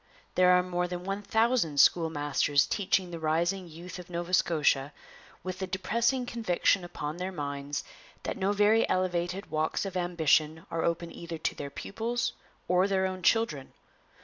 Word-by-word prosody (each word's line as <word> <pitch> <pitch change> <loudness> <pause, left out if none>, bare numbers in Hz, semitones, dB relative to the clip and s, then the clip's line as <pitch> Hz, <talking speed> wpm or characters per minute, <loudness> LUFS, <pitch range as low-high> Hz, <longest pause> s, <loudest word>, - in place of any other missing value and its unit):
There 180 0 +5
are 180 0 +5
more 180 -1 -1
than 180 0 -5
one 195 +2 -3
thousand 220 - +1
schoolmasters 145 -4 +3
teaching 190 -2 0
the 170 - -5
rising 170 +4 0
youth 170 +3 -9
of 180 - -10
Nova 175 +1 -4
Scotia 150 -5 +2 0.5
with 185 0 -5
the 190 - -3
depressing 235 +7 0
conviction 200 -5 +1
upon 155 -2 -5
their 185 +1 -3
minds 145 -3 -4 0.4
that - - -3
no 195 0 0
very 210 +2 +3
elevated 185 0 -1
walks 155 +5 0
of 190 -1 -5
ambition 160 -2 +1
are 165 - -1
open 170 0 -1
either 170 -1 -7
to 160 - -1
their 140 - -6
pupils 225 +10 -3 0.3
or 180 +2 +3
their 190 -1 +1
own 185 0 -3
children. 165 -9 +1
180 Hz, 160 wpm, -29 LUFS, 160-190 Hz, 0.5 s, There